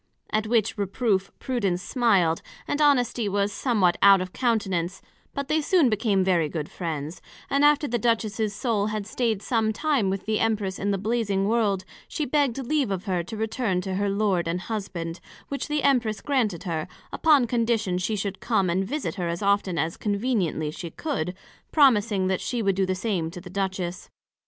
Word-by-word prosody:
At 215 0 +1
which 220 -2 +1
reproof 200 -1 0
Prudence 200 -9 -1
smiled, 195 -10 +2 0.3
and 290 - -1
Honesty 245 -6 +3
was 200 +1 0
somewhat 205 -9 +2
out 195 -1 +8
of 185 0 -5
countenance; 195 -7 0 0.4
but 280 -1 -3
they 310 +1 +2
soon 310 -3 +4
became 205 -3 +2
very 175 -5 +2
good 150 -2 -4
friends: 160 -2 -5 0.3
and 280 +1 +3
after 295 0 +4
the 240 -1 -1
Duchess's 220 -2 0
Soul 210 -1 0
had 215 -1 -3
stayed 220 -2 -1
some 225 -3 +1
time 265 -3 +1
with 195 0 -3
the 215 0 0
Empress 210 -4 0
in 200 - -1
the 200 - +1
Blazing 200 -2 0
World, 205 -4 +1 0.2
she 305 - -2
begg'd 280 -3 +1
leave 290 -3 +1
of 190 -1 -2
her 185 -4 0
to 175 +6 -7
return 220 -3 -1
to 190 +1 -4
her 200 +2 0
Lord 195 -4 +1
and 175 +2 -1
Husband; 185 -6 -4 0.3
which 280 - -3
the 295 0 -1
Empress 235 -7 +2
granted 235 - 0
her, 160 -4 -3 0.3
upon 295 -6 +4
condition 225 -6 0
she 215 +4 -1
should 200 -1 -3
come 195 -7 +1
and 185 +3 +1
visit 275 +8 -3
her 175 - -1
as 170 +3 -3
often 200 -3 +1
as 165 +1 -1
conveniently 200 -8 -1
she 170 +2 -7
could, 185 - -3 0.4
promising 220 -9 +4
that 185 -1 0
she 240 -3 -2
would 195 -1 +2
do 190 0 +1
the 185 - 0
same 185 -5 -1
to 175 +2 -8
the 180 0 -11
Duchess. 185 -2 -3
205 Hz, 185 wpm, -25 LUFS, 185-235 Hz, 0.4 s, out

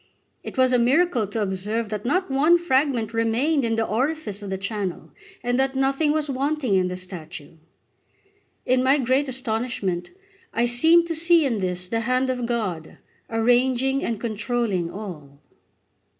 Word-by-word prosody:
It - - -9
was 255 -1 +4
a 250 - +4
miracle 260 - +2
to 210 +2 -2
observe 205 +3 -2
that 210 0 -5
not 365 +3 0
one 305 +6 +5
fragment 265 -8 0
remained 240 +7 +1
in 225 -1 0
the 225 0 0
orifice 235 -3 -2
of 200 - -7
the 190 - -2
channel, 195 -2 -4 0.3
and 245 +1 0
that 270 0 +1
nothing 275 +3 +1
was 305 0 0
wanting 270 -6 0
to 180 - 0
the 180 0 -4
statue. 170 -4 -9 1.1
In 255 0 +3
my 270 +2 +4
great 265 +2 +1
astonishment 225 -8 -3 0.5
I 235 - +2
seemed 320 +8 +4
to 335 - -3
see 335 0 +3
in 235 -6 0
this 180 -1 -3
the 225 +4 -1
hand 255 +3 +1
of 250 -2 -3
God 190 -10 -3 0.3
arranging 250 +4 +2
and 230 -3 -2
controlling 220 -5 -1
all. 155 -9 -9
240 Hz, 160 wpm, -23 LUFS, 205-270 Hz, 1.1 s, one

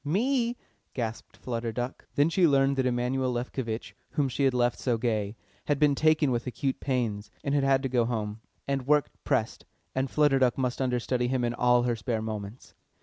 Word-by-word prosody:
"Me?" 235 - +1 0.4
gasped 115 -3 -4
Flutter 115 -2 -3
Duck. 120 +3 -5
Then 145 +2 +4
she 170 +1 +4
learnt 140 -1 +3
that 130 -1 +2
Emanuel 125 +1 0
Lefkovitch, 120 -2 -4 0.2
whom 140 -3 +1
she 135 +2 0
had 135 - +3
left 120 -1 +1
so 120 -3 0
gay, 110 -3 -1 0.3
had 145 - +1
been 145 0 +4
taken 155 -1 +3
with 120 +1 -1
acute 135 +2 -2
pains 115 -6 -1
and 140 - -1
had 145 -1 +2
had 135 0 +3
to - - +1
go 120 -2 +2
home. 110 -2 -3 0.3
And 135 -2 -1
work 150 0 +3
pressed, - - 0 0.3
and 130 0 -1
Flutter 145 -2 +3
Duck 125 -2 +3
must 125 -1 -1
under 125 -2 +1
study 125 0 0
him 130 0 0
in 120 0 0
all 125 0 +3
her 120 -1 +1
spare 110 +1 -2
moments. 110 +1 -6
125 Hz, 200 wpm, -28 LUFS, 120-140 Hz, 0.4 s, Then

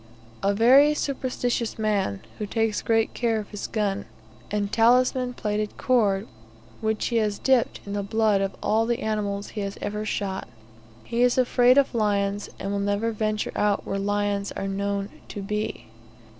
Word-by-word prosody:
A 200 - +2
very 270 +7 +6
superstitious 250 -4 -2
man, 205 - 0 0.2
who 210 - -3
takes 225 -1 0
great 225 -1 +1
care 230 -2 0
of 210 - -7
his 205 - -5
gun, 205 -3 -1 0.4
and 205 -1 -1
talismanic 250 +2 +3
plaited 210 0 -2
cord, 205 -6 +2 0.5
which 220 -1 -1
he 235 - +1
has 210 -2 +1
dipped 260 -3 +2
in 200 - -5
the 205 - -1
blood 215 0 +2
of 195 0 -2
all 225 +1 +2
the 240 +2 0
animals 205 -2 -2
he 210 - -5
has 200 0 -4
ever 210 +1 -3
shot. 200 -2 -3 0.6
He 235 - -2
is 245 0 +4
afraid 250 0 +4
of 280 -2 +3
lions, 205 -2 0
and 195 - -4
will 200 - -1
never 205 +3 0
venture 215 -1 -1
out 205 -1 +1
where 195 - -2
lions 205 0 -1
are 195 - -3
known 200 0 -2 0.2
to 200 - -6
be. 210 +2 -3
210 Hz, 170 wpm, -25 LUFS, 200-230 Hz, 0.6 s, very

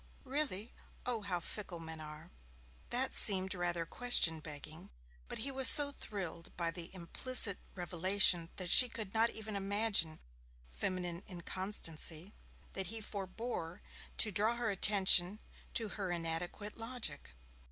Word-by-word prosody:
'Really? 260 -6 -3 0.3
Oh, 240 -3 -2
how 190 -3 -3
fickle 180 0 -7
men 160 -1 -9
are!' 155 +2 -11 0.6
That 260 +2 0
seemed 190 -2 +3
rather 175 -2 -1
question 170 -7 +3
begging, 155 +1 -11 0.4
but - - -6
he 270 +6 -3
was 265 -1 +3
so 290 -1 +6
thrilled 185 -10 -7
by 170 -1 -1
the 165 0 -6
implicit 200 +4 +3 0.2
revelation 180 -1 +3
that 180 -2 -2
she 250 - +10
could 215 -4 -7
not 225 +1 +3
even 220 -2 -7
imagine 200 -5 +1 0.5
feminine 175 - -4
inconstancy, 175 -1 -4 0.4
that 190 -2 -3
he 225 +4 -6
forebore 200 -3 -6 0.3
to 215 - +2
draw 215 +5 +1
her 235 -2 -2
attention 195 -1 +5 0.4
to 225 -2 -1
her 195 -2 -5
inadequate 175 +5 -3
logic. 230 - -5
190 Hz, 130 wpm, -34 LUFS, 170-220 Hz, 0.6 s, she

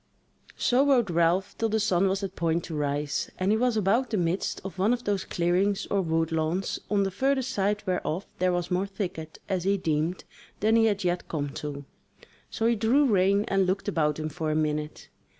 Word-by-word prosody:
So 255 +2 +3
rode 245 -9 +3
Ralph 170 +4 +1
till 225 - +1
the 220 +1 +1
sun 195 -3 +2
was 195 +1 -1
at 195 -1 -4
point 165 0 0
to 160 - -6
rise, 145 0 -1
and 185 +2 +1
he 220 - +3
was 245 -2 +2
about 220 +6 +2
the 215 - -1
midst 175 +1 -1
of 190 -1 -7
one 210 +5 +3
of 245 0 -3
those 200 -2 -1
clearings 180 +3 +1
or 200 - +2
wood 165 -2 0
lawns, 160 +4 -1
on 205 -1 +2
the 195 - -1
further 265 +6 +1
side 210 -5 -1
whereof 180 -1 -2
there 185 0 +2
was 175 0 -2
more 185 +2 +1
thicket, 175 -5 -5
as 185 -3 -1
he 200 +1 +2
deemed, 160 0 -1 0.4
then 220 +2 +3
he 225 0 +5
had 205 -3 +1
yet 175 0 -1
come 145 -3 -2
to; 145 0 -6 0.6
so 225 - -2
he 235 0 +3
drew 235 +7 +3
rein 200 -2 +3
and 195 -1 +2
looked 190 +3 -1
about 150 -6 +1
him 155 0 -3
for 160 0 -3
a 155 - 0
minute. 150 -1 -2
190 Hz, 210 wpm, -27 LUFS, 165-205 Hz, 0.6 s, he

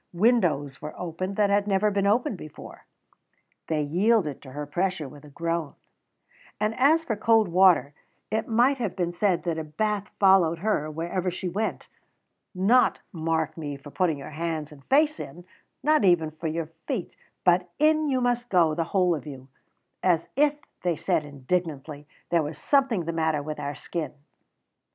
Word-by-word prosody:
Windows 170 - +2
were 150 - -7
opened 180 +3 -4
that 205 -1 +2
had 205 0 +2
never 205 +1 +2
been 200 0 +1
opened 220 +1 +2
before 155 -4 -11 0.8
(they 155 -2 0
yielded 175 - +1
to 130 -2 -12
her 145 +1 -4
pressure 175 +1 -1
with 145 +2 -13
a 150 - -13
groan); 165 0 -3 0.8
and 215 +1 +1
as 310 +5 +5
for 230 -8 -2
cold 220 0 +3
water, 180 -5 +4 0.4
it 220 0 -1
might 245 +4 +3
have 240 - -2
been 175 -2 -1
said 175 -2 +1
that 170 -2 -1
a - - -3
bath 205 +7 -2
followed 190 -4 +5
her 165 -5 0
wherever 170 +4 -2
she 180 +1 -4
went 210 +5 -3 0.7
not, 220 +8 +4
mark 160 -3 -1
me, 145 -3 -5
for 145 +1 -12
putting 170 -3 +1
your 140 - -9
hands 155 -1 -3
and 140 -2 -14
face 300 +3 +3
in, 175 +6 -8 0.4
not 305 -4 +3
even 170 -4 +3
for 160 +1 -5
your 160 0 -3 0.2
feet; 245 - -3 0.3
but 180 0 +3
in 310 0 +3
you 260 -3 +1
must 245 0 0
go, 170 -4 +4
the 165 +1 -1
whole 180 0 +2
of 155 -1 -5
you, 135 -2 -9 0.5
"as 175 -3 +2
if," 295 +2 +3 0.3
they 175 -2 0
said 155 0 0
indignantly, 145 0 -3 0.2
"there 170 -1 +4
was 150 +1 -5
something 265 - +2
the 170 - -2
matter 160 -2 0
with 155 +1 -5
our 145 0 -4
skin." 165 -4 -5
175 Hz, 175 wpm, -26 LUFS, 155-210 Hz, 0.8 s, as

